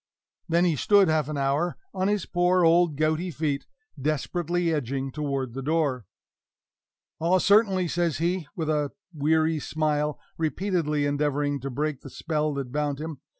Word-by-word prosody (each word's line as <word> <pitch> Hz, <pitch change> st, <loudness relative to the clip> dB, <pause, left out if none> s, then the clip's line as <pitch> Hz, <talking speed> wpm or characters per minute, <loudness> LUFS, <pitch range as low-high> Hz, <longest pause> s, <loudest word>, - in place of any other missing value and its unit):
Then 170 Hz, +2 st, +3 dB
he 170 Hz, -3 st, +2 dB
stood 200 Hz, +5 st, +4 dB
half 155 Hz, -2 st, +1 dB
an 150 Hz, -, -3 dB
hour 140 Hz, +5 st, 0 dB, 0.2 s
on 190 Hz, 0 st, 0 dB
his 205 Hz, -3 st, 0 dB
poor 180 Hz, 0 st, +2 dB
old 165 Hz, -1 st, +4 dB
gouty 155 Hz, +4 st, +1 dB
feet, 150 Hz, -4 st, -2 dB, 0.3 s
desperately 170 Hz, +3 st, 0 dB
edging 135 Hz, -1 st, -2 dB
toward 140 Hz, -4 st, -3 dB
the 135 Hz, -, -5 dB
door. 140 Hz, -, 0 dB, 1.1 s
"Ah, 170 Hz, +3 st, +3 dB
certainly," 195 Hz, -2 st, +4 dB
says 170 Hz, -2 st, 0 dB
he, 170 Hz, 0 st, -1 dB
with 160 Hz, -2 st, -3 dB
a 150 Hz, -2 st, 0 dB, 0.2 s
weary 155 Hz, +1 st, +2 dB
smile, 150 Hz, 0 st, -1 dB, 0.2 s
repeatedly 160 Hz, -3 st, 0 dB
endeavoring 145 Hz, 0 st, 0 dB
to 135 Hz, +2 st, -5 dB
break 145 Hz, +1 st, -2 dB
the -, -, -10 dB
spell 155 Hz, -2 st, -1 dB
that 135 Hz, -3 st, -4 dB
bound 145 Hz, 0 st, -1 dB
him. 155 Hz, -3 st, -6 dB
155 Hz, 150 wpm, -26 LUFS, 145-175 Hz, 1.1 s, stood